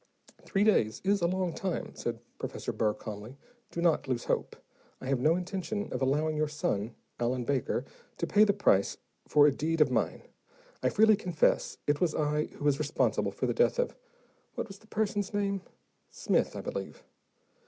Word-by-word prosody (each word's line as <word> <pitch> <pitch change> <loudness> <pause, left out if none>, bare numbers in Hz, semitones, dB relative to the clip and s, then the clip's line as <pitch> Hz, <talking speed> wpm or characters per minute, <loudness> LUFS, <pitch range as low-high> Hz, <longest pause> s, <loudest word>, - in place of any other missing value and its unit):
"Three 195 0 0
days 115 - +3
is 200 0 +2
a 170 - +3
long 185 -1 -1
time," 195 -6 -3
said 115 -1 -4 0.2
Professor - - -4
Burr 105 -1 +1
calmly. 110 +5 -8 0.3
"Do 170 - -3
not 165 -3 +2
lose 125 -2 -1
hope: - - -1 0.4
I - - -9
have 135 -1 +1
no 155 +6 +4
intention 195 +3 -3
of 125 - -3
allowing 150 +4 +1
your 155 0 +1
son, 115 -7 -2 0.2
Allen 120 +1 0
Baker, 130 -1 -1 0.3
to - - -1
pay 205 +5 +5
the 210 - +5
price 100 - +2 0.3
for 145 -1 +6
a 150 - +6
deed 160 +4 -1
of 150 - +5
mine. - - 0 0.6
I - - +2
freely 220 0 +5
confess 180 -6 +1
it 145 0 +1
was 170 -4 +2
I 150 0 +1
who 145 - -9
was 145 -1 +3
responsible 155 0 +1
for - - -2
the - - +1
death 485 +1 +3
of - - 0 0.6
what - - -3
was 195 -1 -11
the 220 - -21
person's 205 -2 -1
name? 200 -1 0 0.5
Smith, - - 0
I - - -4
believe." - - -6
155 Hz, 185 wpm, -30 LUFS, 135-195 Hz, 0.6 s, for